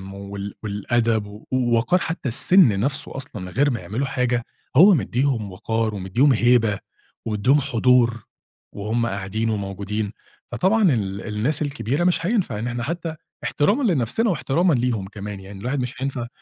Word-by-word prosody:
وال 100 Hz, 0 st, -7 dB
والأدب 110 Hz, +1 st, 0 dB
و 105 Hz, +1 st, -12 dB
وقار 125 Hz, +7 st, +2 dB
حتى 165 Hz, -6 st, -3 dB
السِنّ 125 Hz, -, +5 dB
نَفسه 135 Hz, +4 st, -2 dB
أصلًا 130 Hz, -7 st, -6 dB
من 90 Hz, -, -6 dB
غير 145 Hz, +9 st, +2 dB
ما 120 Hz, -, -2 dB
يعملوا 120 Hz, +7 st, -3 dB
حاجة 125 Hz, -3 st, 0 dB, 0.3 s
هو 185 Hz, +8 st, +8 dB
مديهم 120 Hz, -, 0 dB
وقار 110 Hz, +3 st, -2 dB
ومديهم 110 Hz, +9 st, +2 dB
هيبة 115 Hz, -3 st, +3 dB, 0.5 s
ومديهم 120 Hz, +7 st, +2 dB
حضور 120 Hz, -1 st, +2 dB, 0.5 s
وهُم 110 Hz, +3 st, -1 dB
قاعدين 100 Hz, +1 st, -2 dB
وموجودين، 100 Hz, 0 st, -3 dB, 0.4 s
فطبعًا 190 Hz, -, +3 dB
ال 100 Hz, -3 st, -2 dB
الناس 135 Hz, +9 st, 0 dB
الكبيرة 145 Hz, +1 st, -1 dB
مش 175 Hz, -2 st, +1 dB
هينفع 195 Hz, -, 0 dB
إن 115 Hz, -, -3 dB
إحنا 120 Hz, 0 st, -3 dB
حتى 165 Hz, +3 st, -4 dB, 0.3 s
احترامًا 205 Hz, -, +1 dB
لنَفسنا 140 Hz, -, +1 dB
واحترامًا 170 Hz, 0 st, +1 dB
ليهم 120 Hz, -6 st, 0 dB
كمان 100 Hz, 0 st, -7 dB
يعني 95 Hz, 0 st, -10 dB
الواحد 125 Hz, +6 st, -2 dB
مش 125 Hz, 0 st, -3 dB
هينفع 130 Hz, -3 st, -3 dB
120 Hz, 150 wpm, -22 LUFS, 105-140 Hz, 0.5 s, هو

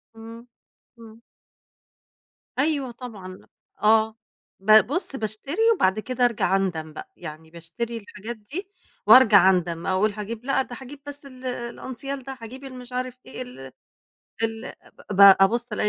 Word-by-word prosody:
إمم 230 Hz, +1 st, -11 dB, 0.5 s
إمم. 225 Hz, 0 st, -14 dB, 1.4 s
أيوه 280 Hz, -4 st, +1 dB
طبعًا، 225 Hz, -7 st, -9 dB
ل 185 Hz, 0 st, -12 dB, 0.4 s
آه 220 Hz, +1 st, +4 dB, 0.4 s
ب 215 Hz, +3 st, +6 dB
بُصّ 290 Hz, -1 st, -2 dB
باشتري 220 Hz, -, -4 dB, 0.2 s
وبعد 190 Hz, -, +2 dB
كده 250 Hz, +2 st, 0 dB
أرجع 225 Hz, -5 st, +1 dB
أندم 160 Hz, -5 st, -2 dB
بقى، -, -, -9 dB
يعني 160 Hz, -1 st, -9 dB
باشتري 195 Hz, +8 st, -5 dB
الحاجات 215 Hz, +2 st, -8 dB
دي 310 Hz, -, -7 dB, 0.4 s
وأرجع 210 Hz, -7 st, +8 dB
أندم، 170 Hz, -2 st, 0 dB
أقول 190 Hz, +3 st, +2 dB
هاجيب 220 Hz, +3 st, -6 dB
لأ، 275 Hz, -1 st, +2 dB
ده 245 Hz, -2 st, -7 dB
هاجيب 275 Hz, +2 st, -10 dB
بس 285 Hz, 0 st, -8 dB
ال 255 Hz, -1 st, -12 dB
الأنسيال 255 Hz, +2 st, -5 dB
ده، 265 Hz, -1 st, -8 dB
هاجيب 255 Hz, +4 st, -9 dB
المش 250 Hz, -2 st, -10 dB
عارف 255 Hz, 0 st, -4 dB
إيه -, -, -8 dB
ال 250 Hz, -, -9 dB, 0.8 s
ال 225 Hz, 0 st, -3 dB, 0.4 s
ب 200 Hz, 0 st, 0 dB, 0.2 s
أبُصّ 235 Hz, +4 st, +2 dB
ألاقي 210 Hz, 0 st, 0 dB
230 Hz, 145 wpm, -24 LUFS, 205-255 Hz, 1.4 s, وأرجع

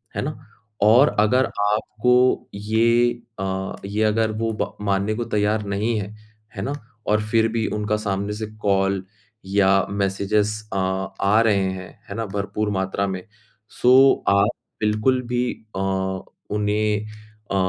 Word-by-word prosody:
है -, -, -1 dB
ना? -, -, -4 dB, 0.4 s
और 120 Hz, +7 st, +5 dB
अगर 125 Hz, +5 st, +4 dB
आपको 110 Hz, +4 st, +1 dB
ये 115 Hz, +3 st, +3 dB, 0.3 s
अ, 95 Hz, 0 st, -3 dB
ये 105 Hz, +2 st, -1 dB
अगर 110 Hz, +1 st, +2 dB
वो 115 Hz, +1 st, -2 dB
ब -, -, -3 dB
मानने 100 Hz, +1 st, +1 dB
को 120 Hz, -, -2 dB
तैयार 105 Hz, 0 st, 0 dB
नहीं 105 Hz, +3 st, -1 dB
हैं, 105 Hz, +1 st, -6 dB, 0.4 s
है 95 Hz, -, -4 dB
ना? 140 Hz, -, -2 dB, 0.3 s
और 105 Hz, 0 st, +3 dB
फिर 115 Hz, 0 st, +3 dB
भी 115 Hz, -1 st, -1 dB
उनका 105 Hz, 0 st, 0 dB
सामने 100 Hz, -1 st, -2 dB
से 110 Hz, +1 st, -4 dB, 0.2 s
कॉल 95 Hz, -1 st, +1 dB, 0.4 s
या 95 Hz, 0 st, +3 dB
मैसेजेज़ 100 Hz, +1 st, 0 dB, 0.2 s
अ, -, -, -1 dB, 0.4 s
आ 105 Hz, +3 st, +4 dB
रहे 110 Hz, -3 st, +3 dB, 0.2 s
हैं, 95 Hz, 0 st, -10 dB
है 100 Hz, -, -5 dB
ना? 115 Hz, 0 st, -2 dB
भरपूर 100 Hz, +1 st, -2 dB
मात्रा 95 Hz, 0 st, -1 dB
में, 95 Hz, -1 st, -4 dB, 0.5 s
सो 130 Hz, +2 st, +5 dB
आप 100 Hz, +1 st, +4 dB, 0.3 s
बिल्कुल 110 Hz, +5 st, +2 dB
भी 125 Hz, 0 st, 0 dB, 0.3 s
अ, -, -, -1 dB, 0.7 s
उन्हें 105 Hz, 0 st, 0 dB, 0.5 s
अ, 100 Hz, -, 0 dB
105 Hz, 145 wpm, -22 LUFS, 100-110 Hz, 0.7 s, और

